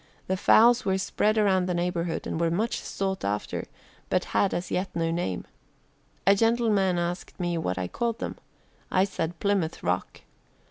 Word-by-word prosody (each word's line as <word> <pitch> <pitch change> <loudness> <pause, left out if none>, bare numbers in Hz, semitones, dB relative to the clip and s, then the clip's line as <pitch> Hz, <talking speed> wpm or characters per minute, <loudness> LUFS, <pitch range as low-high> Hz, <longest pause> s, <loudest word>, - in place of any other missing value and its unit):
The 190 - 0
fowls 235 +5 +5
were 190 0 +1
spread 215 +3 +1
around 190 -4 +3
the 180 - 0
neighborhood 175 -1 -1
and 160 - -2
were 165 - +3
much 210 +8 0
sought 190 -1 -3
after, 100 +1 -2 0.4
but - - +1
had 195 - +3
as 175 - -3
yet 185 +2 -1
no 165 -1 0
name. 130 - -2 0.8
A 195 - +7
gentleman 215 -4 +2
asked 175 +2 -3
me 175 -1 -1
what 90 - -2
I 90 -1 -2
called 230 - -2
them. - - -5 0.5
I 185 - +3
said 170 -4 -3
'Plymouth 195 -5 0
Rock.' 90 +1 -2
185 Hz, 170 wpm, -27 LUFS, 170-200 Hz, 0.8 s, A